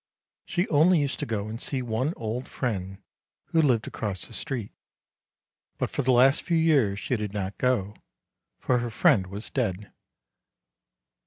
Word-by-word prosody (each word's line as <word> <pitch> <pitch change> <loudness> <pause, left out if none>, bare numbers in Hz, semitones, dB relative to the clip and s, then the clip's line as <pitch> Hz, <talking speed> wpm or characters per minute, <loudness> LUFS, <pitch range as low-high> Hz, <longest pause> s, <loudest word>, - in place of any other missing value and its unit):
She 175 +2 0
only 165 +4 +5
used 145 -3 -1
to - - -3
go 105 -2 -2
and 115 +2 -6
see 130 -3 -2
one 125 +7 -1
old 115 +3 -4
friend, 95 -5 -4 0.5
who 165 - +3
lived 125 -7 +2
across 100 -5 -4
the - - -13
street; 120 -7 -4 1.1
but - - -2
for - - -1
the 130 - -2
last 130 +3 +5
few 170 -2 0
years 140 -12 +3
she 125 - -1
did 105 -3 -4
not 100 -1 -3
go, 110 -6 +1 0.6
for 125 -1 +1
her 120 0 -3
friend 100 -3 +3
was 100 +4 -6
dead. 105 -6 -2
115 Hz, 160 wpm, -26 LUFS, 105-135 Hz, 1.1 s, only